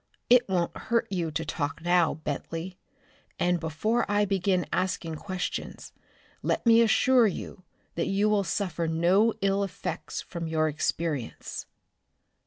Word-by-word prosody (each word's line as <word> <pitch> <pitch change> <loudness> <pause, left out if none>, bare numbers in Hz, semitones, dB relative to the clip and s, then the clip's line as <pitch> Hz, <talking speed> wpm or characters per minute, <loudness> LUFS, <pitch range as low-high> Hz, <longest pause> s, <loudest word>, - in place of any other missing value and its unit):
It 245 -3 +6
won't 175 -3 0
hurt 230 0 0
you 175 -4 -1
to 160 +1 -3
talk 150 +1 -3
now, 175 -2 +3
Bentley, 165 +4 -5 0.6
and 175 0 +1
before 215 +10 0
I 205 0 +3
begin 190 -2 +1
asking 180 -3 -1
questions, 185 +1 -5 0.5
let - - -1
me 230 0 +7
assure 240 +1 +5
you 185 -1 -6 0.3
that 170 - -1
you 200 +2 +2
will 210 -1 +2
suffer 175 -2 -2
no 180 +7 +3
ill 195 0 +2
effects 195 - -5
from 170 -2 -5
your 160 -1 +1
experience." 155 -3 -3
180 Hz, 135 wpm, -27 LUFS, 165-205 Hz, 0.6 s, me